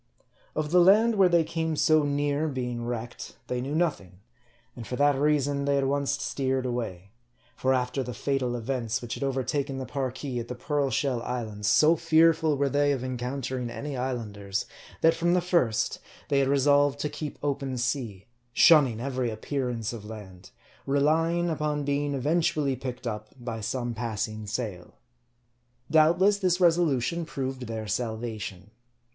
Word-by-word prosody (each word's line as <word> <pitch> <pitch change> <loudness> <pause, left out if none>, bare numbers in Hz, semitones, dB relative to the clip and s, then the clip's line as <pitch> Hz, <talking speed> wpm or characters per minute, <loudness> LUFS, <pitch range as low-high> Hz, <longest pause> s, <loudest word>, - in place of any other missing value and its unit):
Of 155 -1 -2
the 180 - +6
land 215 +6 +6
where 195 -3 +5
they 170 -1 +4
came 160 0 -2
so 155 +1 +4
near 145 +1 0
being 125 -4 -3
wrecked, 120 0 -6
they 125 0 -2
knew 140 +4 -3
nothing; 155 - -1 0.6
and 120 -3 -8
for 125 - -3
that 145 +1 +3
reason, 145 0 +1
they 140 0 +2
at 135 - +1
once 140 0 0
steered 130 0 -1
away. 110 -7 -4 0.4
For 130 - 0
after 125 +1 0
the 125 -2 -5
fatal 130 -1 -1
events 120 -2 -2
which 120 - -4
had - - -6
overtaken 135 +1 -1
the 130 - -4
Parki 130 -1 -3
at 115 - -5
the 125 - -5
Pearl 145 +2 -1
Shell 130 -3 0
islands, 110 -5 -4
so 155 +9 +5
fearful 160 -1 +3
were 140 0 +2
they 145 +1 +2
of 130 -2 -3
encountering 130 0 -3
any 140 +4 -5
Islanders, 105 -6 -3 0.4
that 165 0 +5
from 175 +1 +1
the - - +4
first 170 - +1 0.3
they 140 -2 +3
had 135 - +2
resolved 145 +1 +3
to 150 - 0
keep 150 0 -6
open 140 -2 -2
sea, 115 -5 -2 0.3
shunning 135 -9 +6
every 130 -1 -2
appearance 120 0 -3
of 115 -3 -7
land; 100 -4 -10 0.4
relying 165 +5 +2
upon 150 -2 -1
being 145 0 0
eventually 150 0 +1
picked 125 0 -6
up 105 -2 -4
by 115 -2 -5
some 120 +2 -2
passing 110 -2 -4
sail. 100 -5 -5 1.0
Doubtless 175 +6 +4
this 185 -2 +1
resolution 170 -3 +2
proved 130 -5 -4
their 110 -1 -4
salvation. 110 -3 -4
135 Hz, 160 wpm, -27 LUFS, 120-150 Hz, 1.0 s, the